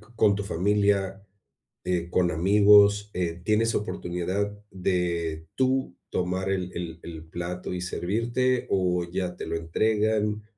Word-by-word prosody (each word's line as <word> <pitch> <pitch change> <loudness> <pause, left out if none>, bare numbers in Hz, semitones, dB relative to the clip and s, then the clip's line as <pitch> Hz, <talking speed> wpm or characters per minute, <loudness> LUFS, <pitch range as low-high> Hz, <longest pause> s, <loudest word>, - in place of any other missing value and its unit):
con 105 -3 +4
tu 100 - -3
familia, 100 +1 +1 0.6
eh, 85 -1 -1
con 90 -1 +2
amigos?, 100 +3 +5
eh, 85 -1 -2
¿tienes 110 +2 +2
oportunidad 95 +1 -2
de 85 -3 -1
tú 130 -7 0 0.2
tomar 95 +1 -1
el 90 -1 -2
el 85 -1 -5
el 80 -2 -8
plato 85 +2 -5
y 90 - -3
servirte 115 +8 0
o 90 -2 +1
ya 90 +1 -3
te - - -6
lo - - -2
entregan? 105 +5 0
95 Hz, 130 wpm, -26 LUFS, 90-105 Hz, 0.6 s, amigos